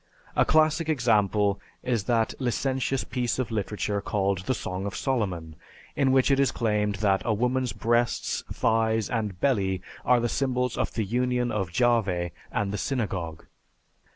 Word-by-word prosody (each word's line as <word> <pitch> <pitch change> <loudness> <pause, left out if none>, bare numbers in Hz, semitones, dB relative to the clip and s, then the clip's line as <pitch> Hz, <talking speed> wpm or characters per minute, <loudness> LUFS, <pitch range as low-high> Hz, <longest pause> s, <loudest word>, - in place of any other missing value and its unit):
A - - +4
classic 155 +1 +3
example 105 -7 +2 0.2
is 115 -6 0
that 115 -1 +1
licentious 130 +1 0
piece 125 -1 -2
of 130 -2 -2
literature 105 -1 -2
called 100 -3 0
the 130 - +1
"Song 95 -1 -4
of 100 - -5
Solomon," 95 - -2 0.4
in 135 -2 +3
which 130 +1 +4
it 135 - +3
is 135 -2 +3
claimed 105 -3 0
that 95 -2 +3
a 110 - +1
woman's 125 +2 0
breasts, 120 +1 0
thighs, 110 -1 +1
and 105 -6 -2
belly 95 -8 +1 0.2
are 125 -1 +4
the 120 - 0
symbols 125 -1 0
of - - -2
the 110 - 0
union 125 +2 0
of 95 -5 -2
Jahveh 100 -6 +1 0.2
and 100 -1 -1
the 105 - -2
Synagogue. 95 - -3
115 Hz, 155 wpm, -26 LUFS, 100-125 Hz, 0.4 s, A